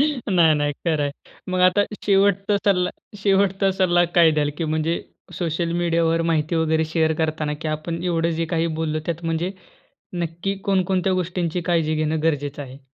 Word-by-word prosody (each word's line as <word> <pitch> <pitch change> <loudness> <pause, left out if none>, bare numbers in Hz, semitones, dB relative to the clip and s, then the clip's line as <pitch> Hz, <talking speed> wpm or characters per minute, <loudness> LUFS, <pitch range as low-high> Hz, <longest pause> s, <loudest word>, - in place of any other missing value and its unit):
नाही, 205 - +3
नाही. 145 0 0
खरं 155 0 -1
आहे. 145 - -1 0.4
मग 185 0 0
आता 185 +3 +5 0.2
शेवटचा 200 0 +3
सल्ला 180 -3 +2 0.3
शेवटचा 195 -1 +2
सल्ला 175 -2 +3
काय 170 -2 +6
द्याल, 150 -1 0
की 165 - -1
म्हणजे 155 +2 -1 0.4
सोशल 170 0 -1
मीडियावर 170 -1 +1
माहिती 165 0 0
वगैरे 160 0 +1
शेअर 160 0 +1
करताना, 155 -1 -1
की 160 - -3
आपण 165 +2 -4
एवढं 170 -1 +1
जे - - +1
काही 165 0 +1
बोललो 155 -1 -1
त्यात 170 0 -3
म्हणजे, 165 +3 -1 0.7
नक्की 170 +4 -3
कोणकोणत्या 190 -1 +1
गोष्टींची 180 -1 -1
काळजी 165 -3 +1
घेणं 155 0 -1
गरजेचं 145 -2 -1
आहे? 130 0 -11
165 Hz, 160 wpm, -22 LUFS, 155-185 Hz, 0.7 s, काय